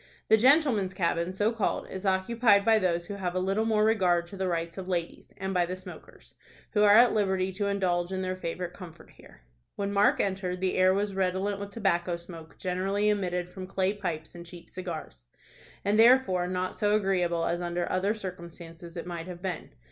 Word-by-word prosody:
The 220 Hz, -, +8 dB
gentlemen's 240 Hz, -, +3 dB
cabin, 170 Hz, -1 st, 0 dB
so 205 Hz, +4 st, +1 dB
called, 225 Hz, -4 st, -2 dB
is 190 Hz, +1 st, -5 dB
occupied 200 Hz, +2 st, +3 dB
by 225 Hz, -1 st, +5 dB
those 175 Hz, -3 st, 0 dB
who 205 Hz, -, -6 dB
have 185 Hz, -3 st, -3 dB
a -, -, +1 dB
little 195 Hz, +4 st, 0 dB
more 215 Hz, -1 st, +2 dB
regard 185 Hz, -6 st, +2 dB
to 200 Hz, -, -9 dB
the 190 Hz, -1 st, -2 dB
rights 170 Hz, +1 st, -3 dB
of 185 Hz, -, -7 dB
ladies, 175 Hz, -2 st, -4 dB
and 190 Hz, 0 st, -3 dB
by 175 Hz, -2 st, +2 dB
the 185 Hz, -, -4 dB
smokers, 185 Hz, -1 st, -13 dB, 0.4 s
who 210 Hz, -, +2 dB
are 205 Hz, 0 st, +7 dB
at 240 Hz, +2 st, +6 dB
liberty 190 Hz, -3 st, +1 dB
to 200 Hz, +2 st, -2 dB
indulge 180 Hz, -3 st, 0 dB
in 190 Hz, 0 st, -2 dB
their 185 Hz, 0 st, -2 dB
favorite 180 Hz, 0 st, -5 dB
comfort 170 Hz, -3 st, -12 dB
here. -, -, -18 dB, 0.3 s
When 200 Hz, 0 st, -3 dB
Mark 200 Hz, +1 st, +3 dB
entered, 190 Hz, -2 st, -1 dB
the 185 Hz, 0 st, 0 dB
air 185 Hz, 0 st, +5 dB
was 200 Hz, +1 st, -1 dB
redolent 190 Hz, +1 st, -1 dB
with 200 Hz, 0 st, -6 dB
tobacco 185 Hz, -5 st, 0 dB
smoke, 170 Hz, -2 st, -12 dB
generally 195 Hz, +3 st, 0 dB
emitted 180 Hz, -4 st, -1 dB
from 185 Hz, +1 st, -9 dB
clay 190 Hz, +1 st, 0 dB
pipes 170 Hz, -6 st, -5 dB
and 175 Hz, 0 st, -9 dB
cheap 170 Hz, 0 st, -13 dB
cigars, 160 Hz, -, -7 dB, 0.6 s
and 205 Hz, +2 st, +2 dB
therefore 225 Hz, -7 st, +5 dB
not 185 Hz, 0 st, -2 dB
so 210 Hz, -1 st, +2 dB
agreeable 180 Hz, -5 st, +1 dB
as 175 Hz, +1 st, -1 dB
under 175 Hz, 0 st, -2 dB
other 195 Hz, +4 st, +1 dB
circumstances 170 Hz, -3 st, -9 dB
it 170 Hz, -, -5 dB
might 170 Hz, -1 st, -6 dB
have 180 Hz, 0 st, -9 dB
been. 180 Hz, -4 st, -4 dB
185 Hz, 200 wpm, -28 LUFS, 175-200 Hz, 0.6 s, The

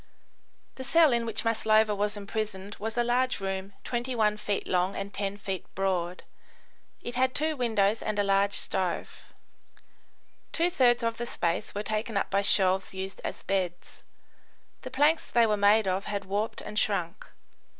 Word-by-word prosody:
The 260 Hz, -, -5 dB
cell 310 Hz, +1 st, +5 dB
in 235 Hz, -1 st, +1 dB
which 225 Hz, 0 st, -1 dB
Maslova 220 Hz, -1 st, +3 dB
was 205 Hz, +1 st, -1 dB
imprisoned 205 Hz, -1 st, -4 dB
was 220 Hz, +2 st, -4 dB
a 240 Hz, -, +3 dB
large 250 Hz, +2 st, +1 dB
room 195 Hz, 0 st, -4 dB
21 240 Hz, -4 st, 0 dB
feet 205 Hz, -1 st, -2 dB
long 180 Hz, +1 st, +1 dB
and 200 Hz, +1 st, -5 dB
10 200 Hz, 0 st, -2 dB
feet 195 Hz, -3 st, -4 dB
broad; 185 Hz, -2 st, -1 dB, 0.8 s
it 240 Hz, -, -5 dB
had 255 Hz, +1 st, +1 dB
two 310 Hz, +1 st, +1 dB
windows 220 Hz, -4 st, +1 dB
and 215 Hz, -1 st, -2 dB
a 205 Hz, -, +3 dB
large 200 Hz, 0 st, +2 dB
stove. 185 Hz, -3 st, -3 dB, 1.2 s
Two 340 Hz, +2 st, +1 dB
thirds 245 Hz, -7 st, +3 dB
of 230 Hz, 0 st, -1 dB
the 240 Hz, -, -4 dB
space 175 Hz, +2 st, -2 dB
were 205 Hz, -, -2 dB
taken 215 Hz, 0 st, -2 dB
up -, -, -1 dB
by 200 Hz, +1 st, +3 dB
shelves 190 Hz, -1 st, +2 dB
used 190 Hz, 0 st, -5 dB
as -, -, -5 dB
beds. 180 Hz, -3 st, -3 dB, 0.8 s
The -, -, -7 dB
planks 295 Hz, +4 st, +2 dB
they 235 Hz, -1 st, +4 dB
were 215 Hz, -1 st, +2 dB
made 205 Hz, +1 st, +4 dB
of 190 Hz, +2 st, -1 dB
had 200 Hz, -1 st, -3 dB
warped 205 Hz, +3 st, -2 dB
and 210 Hz, -, -3 dB
shrunk. 190 Hz, -3 st, -1 dB
210 Hz, 165 wpm, -28 LUFS, 195-235 Hz, 1.2 s, cell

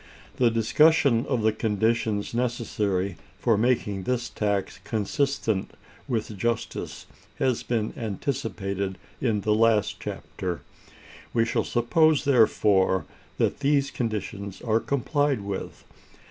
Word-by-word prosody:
The 125 Hz, -2 st, +4 dB
discussion 120 Hz, +2 st, +4 dB
of 125 Hz, -5 st, 0 dB
the 110 Hz, -, +4 dB
conditions 110 Hz, 0 st, 0 dB
necessary 105 Hz, -6 st, -1 dB, 0.2 s
for 115 Hz, -3 st, +2 dB
making 105 Hz, -3 st, +1 dB
this 120 Hz, +4 st, -2 dB
tax 100 Hz, -2 st, -1 dB
consistent 110 Hz, -2 st, -1 dB, 0.3 s
with 110 Hz, -4 st, -2 dB
justice 115 Hz, +1 st, -2 dB, 0.3 s
has 130 Hz, -3 st, +1 dB
been 110 Hz, -3 st, -1 dB
anticipated 100 Hz, -4 st, -3 dB, 0.2 s
in 110 Hz, -5 st, +1 dB
the 105 Hz, +2 st, +2 dB
last 110 Hz, -1 st, +3 dB
chapter. 90 Hz, -2 st, -5 dB, 0.7 s
We 115 Hz, -1 st, +4 dB
shall 115 Hz, -, 0 dB
suppose, 150 Hz, +6 st, +3 dB
therefore, 105 Hz, -7 st, +3 dB, 0.3 s
that -, -, +1 dB
these 140 Hz, -1 st, +2 dB
conditions 105 Hz, -4 st, -4 dB
are 115 Hz, -1 st, +2 dB
complied 140 Hz, 0 st, 0 dB
with. 100 Hz, -1 st, -5 dB
115 Hz, 110 wpm, -26 LUFS, 100-125 Hz, 0.7 s, The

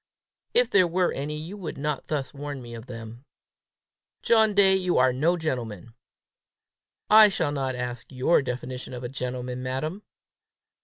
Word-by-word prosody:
"If -, -, +4 dB
there 185 Hz, -3 st, +5 dB
were 180 Hz, +1 st, +1 dB
any, 150 Hz, +2 st, -4 dB
you 165 Hz, +6 st, -7 dB
would 180 Hz, -6 st, -6 dB
not 150 Hz, 0 st, -3 dB
thus 145 Hz, -4 st, -3 dB
warn 145 Hz, -1 st, -6 dB
me 120 Hz, -2 st, -10 dB
of 115 Hz, +1 st, -9 dB
them." 115 Hz, 0 st, -9 dB, 1.0 s
"John 220 Hz, -3 st, +4 dB
Day, 195 Hz, -1 st, +6 dB
you 185 Hz, -2 st, +1 dB
are 130 Hz, 0 st, +4 dB
no 160 Hz, +7 st, +2 dB
gentleman!" 115 Hz, -, -4 dB, 1.1 s
"I 215 Hz, 0 st, +8 dB
shall 160 Hz, -6 st, -1 dB
not 135 Hz, -3 st, -2 dB
ask 125 Hz, 0 st, -5 dB
your 130 Hz, +6 st, +3 dB
definition 125 Hz, 0 st, -5 dB
of 125 Hz, -, -7 dB
a 120 Hz, -, -4 dB
gentleman, 125 Hz, -1 st, -4 dB
madam." 135 Hz, +9 st, -3 dB
135 Hz, 155 wpm, -26 LUFS, 125-175 Hz, 1.1 s, I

